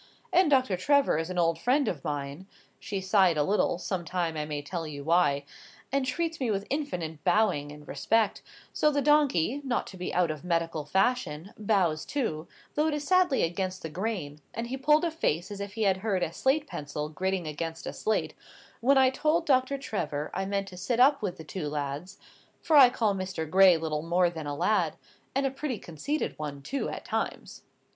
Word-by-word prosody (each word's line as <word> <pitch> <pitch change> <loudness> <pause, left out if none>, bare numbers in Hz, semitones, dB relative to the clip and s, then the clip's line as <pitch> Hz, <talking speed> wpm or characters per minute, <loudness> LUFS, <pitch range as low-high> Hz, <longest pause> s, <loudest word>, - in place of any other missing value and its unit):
And 360 -2 +5
Doctor 260 -9 +3
Trevor 280 - +3
is 165 +2 -3
an 185 - -4
old 165 -1 +2
friend 270 - +2
of 145 -6 -3
mine" 145 +5 -4 0.3
(she 200 - -4
sighed 190 -3 +3
a 150 - +3
little, 200 +1 +1
some 180 0 -3
time 170 -2 -2
I 150 -1 -2
may 150 -1 -4
tell 165 +2 -4
you 145 -2 -7
why), 145 -3 +2 0.5
"and 275 -1 0
treats 330 +4 -2
me 255 -4 0
with 200 -1 -1
infinite 175 - -3
bowing 180 -10 +2
and 150 0 -12
respect; 215 +9 +1 0.3
so 300 - +3
the 285 -1 0
donkey, 285 - +3
not 255 -3 -1
to 190 - -10
be 180 - -4
out 175 -3 +2
of 155 0 -7
medical 165 -3 -1
fashion, 190 -2 0
bows 190 -7 +1
too, 170 - -3 0.3
though 300 +1 +2
it 305 - 0
is 295 - -3
sadly 365 -3 +3
against 185 +2 -2
the 160 - -5
grain; 175 -6 -4
and 230 - -2
he 260 - -2
pulled 300 +4 +3
a 335 - 0
face 185 - -1
as 200 - -6
if 200 0 -6
he 220 0 -2
had 190 -2 +3
heard 190 -2 -1
a 165 - -2
slate 275 - +1
pencil 150 - -5
gritting 185 +3 -2
against 165 +2 -5
a - - -4
slate, 220 - -1 0.5
when 270 +4 +4
I 260 -1 +5
told 310 +5 +1
Doctor 265 -1 +2
Trevor 200 - -3
I 190 +1 -2
meant 200 0 -1
to 180 - -11
sit 230 +6 -1
up 275 +2 +5
with 190 -4 -3
the 160 - -9
two 155 0 -5
lads, 145 +5 -4 0.4
for 320 - +1
I 270 -4 +9
call 220 -4 +1
Mr. 185 -4 -4
Gray 185 +1 +6
little 155 -2 -2
more 175 +2 +2
than 160 -3 -6
a 145 - -3
lad, 215 +8 +1 0.4
and 275 0 +1
a 270 - +1
pretty 270 -2 -3
conceited 175 - -4
one, 145 -2 -5
too, 275 - -2
at - - -7
times." - - -3
190 Hz, 205 wpm, -28 LUFS, 160-260 Hz, 0.5 s, I